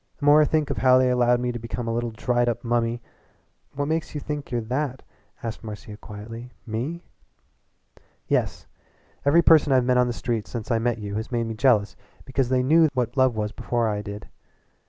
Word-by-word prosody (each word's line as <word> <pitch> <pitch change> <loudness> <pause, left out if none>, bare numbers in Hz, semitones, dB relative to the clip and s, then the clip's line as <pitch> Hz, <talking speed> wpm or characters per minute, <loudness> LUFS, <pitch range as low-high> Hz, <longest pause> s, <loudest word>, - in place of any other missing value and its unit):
The 145 - -5
more 145 +1 +7
I - - +5
think 155 -1 0
of - - -2
how 130 -1 +5
they 130 0 +3
allowed 125 -1 +3
me 125 0 -1
to 120 - -5
become 115 0 -5
a 115 - -1
little 120 0 -1
dried 120 +2 0
up 120 0 -3
mummy 120 0 0 0.3
" - - -40
"What 145 +1 -1
makes 160 0 -2
you - - -1
thank 145 -1 -5
you're 120 -1 -1
that?" 130 +3 -3 0.4
asked 115 -1 -5
Marcia 105 -1 -8
quietly 115 +4 -9 0.2
"me?" 130 +10 -4 1.2
"Yes. - - -1 0.6
Every 165 +4 +5
person 155 -3 +5
I've 130 -2 +4
met 125 0 +3
on 125 - +3
the 120 - -2
streets 115 -3 -3
since 115 0 -5
I 115 - +2
met 120 0 0
you 105 -2 -6
has 110 +4 -5
made 120 -1 0
me 115 - -4
jealous 110 -3 +2 0.3
because 130 -2 -1
they 130 -1 +2
knew 160 +4 +5
what 120 -2 -1
love 130 -3 +3
was 105 -1 -2
before 120 0 -1
I 105 -1 -2
did. 100 0 -8
120 Hz, 210 wpm, -24 LUFS, 115-130 Hz, 1.2 s, more